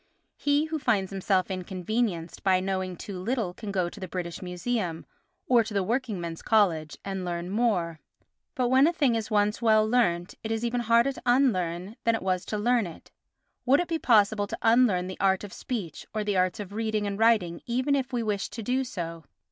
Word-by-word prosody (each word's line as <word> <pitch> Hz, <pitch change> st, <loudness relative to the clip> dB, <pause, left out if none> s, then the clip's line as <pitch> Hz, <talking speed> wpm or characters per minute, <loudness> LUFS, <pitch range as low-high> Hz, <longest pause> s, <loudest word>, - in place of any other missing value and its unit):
He 290 Hz, +1 st, +1 dB
who 315 Hz, 0 st, -3 dB
finds 205 Hz, -8 st, +1 dB
himself 190 Hz, -1 st, 0 dB
inconvenienced 185 Hz, -1 st, -2 dB
by 190 Hz, -2 st, +3 dB
knowing 185 Hz, -1 st, -2 dB
too 195 Hz, -3 st, -7 dB
little 220 Hz, -2 st, -1 dB
can 205 Hz, +2 st, -6 dB
go 185 Hz, -3 st, 0 dB
to 205 Hz, -, -9 dB
the 185 Hz, -, -5 dB
British 170 Hz, -1 st, -5 dB
Museum, 180 Hz, -1 st, -3 dB, 0.4 s
or 240 Hz, -2 st, +4 dB
to 220 Hz, -1 st, -7 dB
the 200 Hz, -, +2 dB
Working 230 Hz, -1 st, -1 dB
Men's 170 Hz, -1 st, -5 dB
College, 170 Hz, -9 st, +2 dB
and 195 Hz, -1 st, -3 dB
learn 175 Hz, 0 st, -4 dB
more; 190 Hz, -8 st, 0 dB, 0.6 s
but 250 Hz, -3 st, +1 dB
when 265 Hz, +3 st, +5 dB
a 340 Hz, -, +1 dB
thing 285 Hz, -8 st, +2 dB
is 225 Hz, -2 st, -2 dB
once 210 Hz, +1 st, +1 dB
well 215 Hz, -2 st, +4 dB
learnt 180 Hz, -7 st, +1 dB
it 220 Hz, -, -3 dB
is 225 Hz, +1 st, -1 dB
even 240 Hz, +1 st, 0 dB
harder 235 Hz, +3 st, +3 dB
to -, -, -11 dB
unlearn 185 Hz, -9 st, +2 dB
it 225 Hz, -, -14 dB
than 230 Hz, 0 st, +3 dB
it 225 Hz, -, -4 dB
was 185 Hz, -1 st, 0 dB
to 210 Hz, -, -3 dB
learn 235 Hz, -1 st, +2 dB
it. 165 Hz, -, -12 dB, 0.6 s
Would 275 Hz, +3 st, +5 dB
it 350 Hz, -, -1 dB
be 330 Hz, -1 st, -1 dB
possible 210 Hz, -4 st, +3 dB
to -, -, -5 dB
unlearn 225 Hz, -6 st, +4 dB
the 185 Hz, 0 st, -7 dB
art 190 Hz, 0 st, +2 dB
of 205 Hz, -, -8 dB
speech 205 Hz, -, -5 dB
or 215 Hz, -, 0 dB
the 205 Hz, -1 st, -1 dB
arts 185 Hz, 0 st, +1 dB
of 200 Hz, -1 st, -7 dB
reading 220 Hz, -1 st, -1 dB
and 200 Hz, 0 st, -3 dB
writing 210 Hz, -7 st, +3 dB
even 255 Hz, +4 st, +1 dB
if 270 Hz, -1 st, 0 dB
we 240 Hz, -2 st, -1 dB
wished 205 Hz, -3 st, -2 dB
to 225 Hz, -, -5 dB
do 255 Hz, +4 st, 0 dB
so? 165 Hz, -8 st, -6 dB
205 Hz, 210 wpm, -27 LUFS, 185-235 Hz, 0.6 s, when